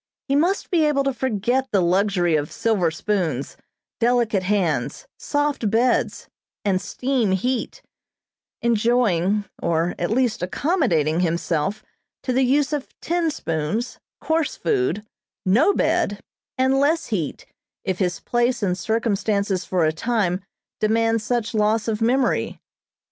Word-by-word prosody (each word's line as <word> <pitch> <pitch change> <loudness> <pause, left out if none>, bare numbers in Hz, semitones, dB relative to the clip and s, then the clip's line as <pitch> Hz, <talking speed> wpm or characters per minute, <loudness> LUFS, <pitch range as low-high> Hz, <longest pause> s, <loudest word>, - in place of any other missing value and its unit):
He 275 - +1
must 350 +7 +1
be 335 -3 +3
able 285 -2 +2
to 275 0 0
forget 250 +1 0
the 200 - +2
luxury 180 -1 +2
of 150 -1 -1
silver 205 -7 +1
spoons, 160 -6 -2 0.4
delicate 235 -4 +2
hands, 180 - -1
soft 290 -6 0
beds, 240 +4 +1 0.4
and 190 -2 +2
steam 250 -6 0
heat; 245 +6 -2 0.8
enjoying, 215 -4 +2 0.2
or 170 +1 +1
at 175 - -1
least 235 -2 +1
accommodating 180 - +1
himself 170 +2 -1 0.4
to 255 - -1
the 260 - +2
use 280 +3 +2
of 290 -2 -5
tin 340 -1 0
spoons, 165 - -3 0.2
coarse 320 -1 0
food, 380 - 0 0.4
no 235 - +4
bed, 205 - +1 0.4
and 260 +1 +3
less 310 +4 +2
heat, 165 -8 -3 0.4
if 190 -2 -2
his 180 -2 0
place 240 -1 0
and 180 -2 0
circumstances 205 -2 0
for 180 -3 +1
a 155 - +1
time 195 -1 0 0.4
demand 225 +1 +2
such 235 +1 -1
loss 215 +1 +1
of 220 -1 -1
memory. 245 +2 +1
220 Hz, 130 wpm, -22 LUFS, 185-255 Hz, 0.8 s, no